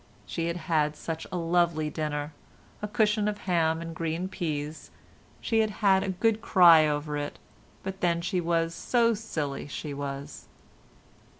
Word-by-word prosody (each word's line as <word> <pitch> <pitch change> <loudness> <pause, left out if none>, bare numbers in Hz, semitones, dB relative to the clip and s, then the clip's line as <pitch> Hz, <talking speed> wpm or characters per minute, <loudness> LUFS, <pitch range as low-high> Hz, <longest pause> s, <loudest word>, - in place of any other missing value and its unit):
She 165 +8 -3
had 170 +1 -2
had 155 -3 0
such 160 +1 -5
a 180 - -2
lovely 165 -2 +1
dinner—a 150 +6 -6
cushion 210 -1 +2
of 210 -1 -1
ham 165 -3 +1
and 165 0 -6
green 165 +3 -2
peas. 155 -4 -4 0.5
She 225 -2 +1
had 220 -1 +3 0.2
had 190 -1 +6
a 195 - -2
good 220 +4 +1
cry 170 -7 +7
over 150 0 -2
it, 145 0 -4 0.5
but 190 0 -6
then 170 -1 +2
she 180 +1 -1
was 165 -1 0
so 235 +4 +2
silly, 155 -11 -4
she 145 0 -5
was. 140 0 -6
165 Hz, 155 wpm, -28 LUFS, 150-190 Hz, 0.5 s, cry